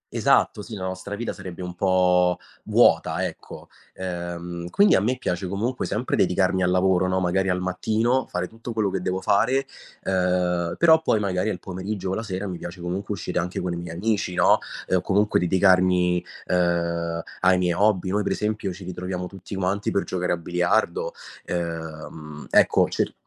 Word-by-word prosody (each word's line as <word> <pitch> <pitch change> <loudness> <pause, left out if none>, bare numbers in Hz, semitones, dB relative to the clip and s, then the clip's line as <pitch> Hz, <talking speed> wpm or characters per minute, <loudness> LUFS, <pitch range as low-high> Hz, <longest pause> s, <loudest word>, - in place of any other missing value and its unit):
esatto, - - +3
sì, 110 +2 -8
la 95 - -6
nostra 95 +2 -4
vita 115 +2 -3
sarebbe 95 -2 -8
un 90 0 -5
po' 90 -1 +3 0.3
vuota, - - +3
ecco. - - -8 0.3
Ehm, 85 -1 -5
quindi, 200 - +5
a - - +4
me 125 +5 0
piace, 90 -6 -2
comunque, 115 +7 -2
sempre 110 +5 -1
dedicarmi 95 0 +2
al 90 - +2
lavoro, 95 0 +3
no, 95 0 +1
magari 95 +1 +1
al 90 0 +1
mattino, 110 +7 0
fare 90 0 -2
tutto 115 +3 -8
quello 105 -3 0
che 95 - -2
devo 95 +1 -2
fare, 125 +8 +2 0.4
ehm, 90 -2 0
però, 160 -1 +6
poi, 115 -9 +2
magari, 100 0 0
al 100 - -2
pomeriggio 95 +1 -4
o - - 0
la 110 - -2
sera 100 -3 -4
mi 90 -3 -5
piace, 85 +1 -8
comunque, 90 +4 -4
uscire 90 -1 -3
anche 90 +1 -3
con 90 - -2
i - - -3
miei 85 -1 -6
amici, 100 -1 -1
no, - - +5 0.3
ehm, 95 - +2
o, - - 0
comunque, 105 +3 +2
dedicarmi, 90 -1 +3 0.2
ehm, 85 -1 0 0.2
ai 95 0 +4
miei 90 -1 +1
hobby. 95 0 +2
Noi, 105 +2 +1
per 100 - 0
esempio, 105 -2 -2
ci 95 +2 -9
ritroviamo 90 0 -4
tutti 95 +1 -9
quanti 95 +2 -1
per 100 - 0
giocare 90 -1 -1
a - - -1
biliardo. 85 +1 0 0.3
Ehm, 80 -3 -5
ecco, - - +5
cer - - -1
90 Hz, 185 wpm, -24 LUFS, 90-100 Hz, 0.4 s, però